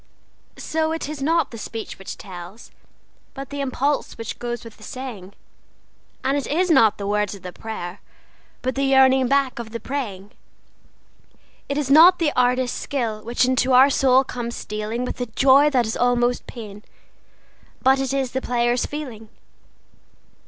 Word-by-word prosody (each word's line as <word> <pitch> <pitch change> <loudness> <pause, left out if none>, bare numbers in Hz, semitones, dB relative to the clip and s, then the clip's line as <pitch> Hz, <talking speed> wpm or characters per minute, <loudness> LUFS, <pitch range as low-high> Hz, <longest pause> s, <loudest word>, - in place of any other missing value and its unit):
So 315 0 -1
it 325 - -4
is 300 -2 -6
not 330 +4 +1
the 230 - -8
speech 225 -1 -7
which 195 - -8
tells, 185 +2 -10 0.6
but 275 0 -8
the 285 0 -3
impulse 275 +2 -1
which 230 -1 -6
goes 240 0 -4
with 230 -2 -12
the - - -21
saying; 215 -7 -8 0.9
And 270 +2 +1
it 285 - -2
is 355 +4 +1
not 225 -9 +5
the 200 - -5
words 210 0 0
of 195 - -14
the 180 -1 -7
prayer, 200 -4 -7 0.6
but 255 +1 -1
the 275 - -2
yearning 265 -1 +5
back 275 -2 +1
of 235 -2 -6
the 230 +1 -6
praying. 210 -8 -5 1.4
It 280 - -1
is 280 -3 -1
not 335 +5 +8
the 315 -4 0
artist's 250 0 +1
skill 230 -6 -3
which 235 +3 +1
into 255 0 +2
our 265 +3 +7
soul 265 -1 +4
comes 240 -2 -5
stealing 215 +3 -4
With 250 - -5
a 245 - -2
joy 270 +5 +5
that 255 -4 +2
is 220 - -3
almost 245 0 +1
pain, 210 -4 -9 1.0
but 265 +1 +4
it 270 0 -1
is 270 -2 -1
the 260 - -2
player's 240 0 0
feeling. 245 -8 -7
250 Hz, 165 wpm, -22 LUFS, 225-275 Hz, 1.4 s, not